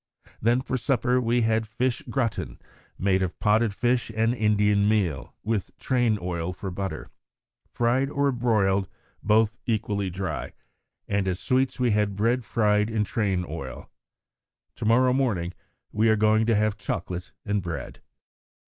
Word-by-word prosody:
Then 120 +3 +3
for 130 0 -2
supper 125 0 +1
we 120 +1 +2
had 110 0 +1
fish 120 +3 -1
'gratin,' 120 -5 -2 0.4
made 95 0 +2
of 95 -2 -2
potted 110 +1 +3
fish 120 0 0
and 115 +2 +2
Indian 105 -2 +2
meal, 95 -11 0
with 110 -3 -2
train 120 -4 +1
oil 90 -1 -3
for 95 +1 -6
butter 95 +1 -5 0.6
fried 125 +3 +1
or 140 -1 +1
boiled 105 -6 +1 0.3
both 110 +2 +2
equally 100 -3 -1
dry 95 +1 -4 0.5
and 100 -1 0
as 90 0 -1
sweets 130 0 0
we 125 -2 +2
had 105 -1 +1
bread 115 +5 +1
fried 105 -1 +2
in 110 -2 0
train 95 -4 -1
oil. 75 -4 -7 0.9
To - - -4
morrow 125 +3 +4
morning 100 -10 0 0.4
we 110 +2 +2
are 110 - +5
going 110 +1 +3
to 115 - +3
have 105 0 +1
chocolate 90 -2 -4
and 105 -1 0
bread." 85 -2 -6
110 Hz, 150 wpm, -26 LUFS, 100-120 Hz, 0.9 s, are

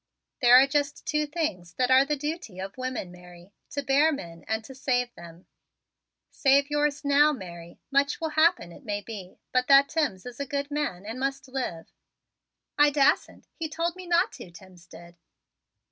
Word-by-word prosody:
"There 245 0 +8
are 265 - +6
just 285 0 -2
two 300 -2 0
things 245 - -3
that 255 0 +1
are 260 +1 +7
the 295 +2 -1
duty 295 - -5
of 190 +1 -6
women, 255 -8 -4
Mary: 180 +1 -15 0.2
to 285 - -4
bear 280 +4 +4
men 170 - -7
and 220 0 -2
to 265 - -11
save 250 -2 -1
them. 170 +1 -13 0.9
Save 280 +1 +3
yours 295 -1 0
now, 285 +2 +5
Mary. 175 - -9
Much 280 +1 +2
will 320 - -2
happen, 315 - +2
it 225 - -14
may 205 -3 -3
be; 200 -4 -9
but 255 0 +1
that 275 0 +6
Timms 285 - -1
is 245 0 -9
a 280 - -3
good 280 +1 -3
man 280 -11 -3
and 225 +4 -6
must 270 0 -3
live." 250 -11 -5 0.9
"I 295 0 +7
dassent. 290 +1 +1
He 320 -2 -5
told 335 +2 -2
me 370 -1 -10
not 345 +1 +2
to, - - -11
Timms 175 0 -16
did." 170 0 -14
270 Hz, 180 wpm, -27 LUFS, 190-295 Hz, 0.9 s, There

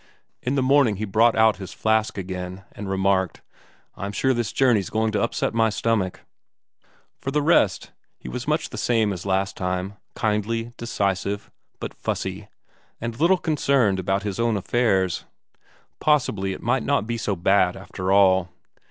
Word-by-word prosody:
In 125 +3 -1
the 135 - +2
morning, 135 -5 +4
he 105 +3 -3
brought 110 +3 +3
out 110 -1 +4
his 95 -2 -8
flask 110 -1 +1
again, 90 0 -5
and 100 -1 -7
remarked: 95 -1 0 0.5
"I'm 100 +1 -4
sure 130 +4 +2
this 120 -3 -2
journey's 120 -8 +2
going 110 0 0
to 105 - 0
upset 115 - -1
my 115 -1 +3
stomach." 105 -4 -1 1.0
For - - -4
the 150 +1 0
rest, 145 - +2 0.3
he - - -11
was - - -5
much - - 0
the - - -5
same 110 -4 +2
as 90 +1 -7
last 95 0 0
time, 90 +2 -3 0.2
kindly, 115 +1 -1
decisive, 100 -3 -2 0.3
but - - -5
fussy, 95 +2 -4 0.5
and 115 0 -5
little 175 +4 +4
concerned 140 - +1
about 95 +2 0
his 100 -1 -4
own 115 -2 +2
affairs. 95 -4 +1 0.7
Possibly 110 -10 +1
it - - -9
might - - +1
not 100 - +1
be 115 +1 -2
so 105 -2 -1
bad 95 0 +2
after 95 -1 -4
all. 95 -2 +4
105 Hz, 160 wpm, -24 LUFS, 95-115 Hz, 1.0 s, morning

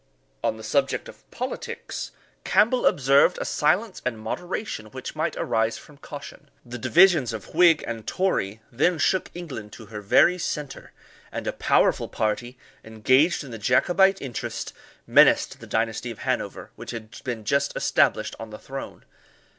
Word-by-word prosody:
On - - 0
the 110 - -10
subject 135 +5 0
of - - -15
politics, - - -5 0.3
Campbell 245 +3 +3
observed 140 0 +4
a - - -3
silence 185 +8 +1
and 125 -3 -2
moderation 175 - -4
which 130 +7 -8
might 155 +2 -1
arise 110 0 0
from 150 - -15
caution. 145 0 -10 0.2
The 120 0 -7
divisions 165 -4 +4
of 110 -3 -8
Whig 165 -1 +5
and 115 -2 -6
Tory 110 - -1
then 155 +8 +2
shook 185 +5 +1
England 130 - -7
to 110 - -11
her 105 - -5
very 175 - +4
centre, 150 -4 -5 0.4
and - - -5
a - - -1
powerful - - +2
party, 120 +4 -2 0.3
engaged 130 +10 +2
in 135 - -10
the 115 - -7
Jacobite 185 - +3
interest, 125 -4 -5 0.3
menaced - - +4
the - - -11
dynasty 115 +2 -1
of 115 - -7
Hanover, - - -3
which - - -10
had 110 -2 -8
been 115 -4 -4
just 140 +4 +1
established - - +2
on 115 -1 -7
the 105 - -8
throne. 135 +3 -8
130 Hz, 155 wpm, -25 LUFS, 110-165 Hz, 0.4 s, Whig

